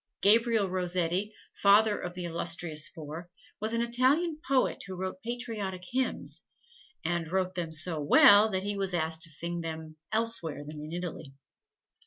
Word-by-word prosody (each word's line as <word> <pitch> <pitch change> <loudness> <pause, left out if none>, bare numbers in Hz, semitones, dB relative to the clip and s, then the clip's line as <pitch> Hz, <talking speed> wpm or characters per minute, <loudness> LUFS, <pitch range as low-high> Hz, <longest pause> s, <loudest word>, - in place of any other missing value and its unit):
Gabriel 225 0 +4
Rossetti, 180 +2 -1 0.2
father 205 +1 +5
of 180 0 -6
the 180 -1 -4
illustrious 165 -2 -2
four, 160 +2 -9 0.3
was 215 +1 -1
an 230 0 +1
Italian 275 +7 +1
poet 265 -7 +1
who 190 - -6
wrote 185 +8 -5
patriotic 225 -7 -4
hymns, 260 +1 -1 0.6
and 170 -1 -1
wrote 185 -1 0
them 175 -3 -4
so 160 +1 +1
well 205 +8 +7
that 190 -2 -2
he 205 0 -1
was 195 -2 0
asked 160 -1 -1
to 165 - 0
sing 170 +3 -2
them 160 -1 -7
elsewhere 220 -10 -1
than 150 0 -8
in 155 +1 -8
Italy. 170 -5 -6
180 Hz, 155 wpm, -29 LUFS, 165-215 Hz, 0.6 s, well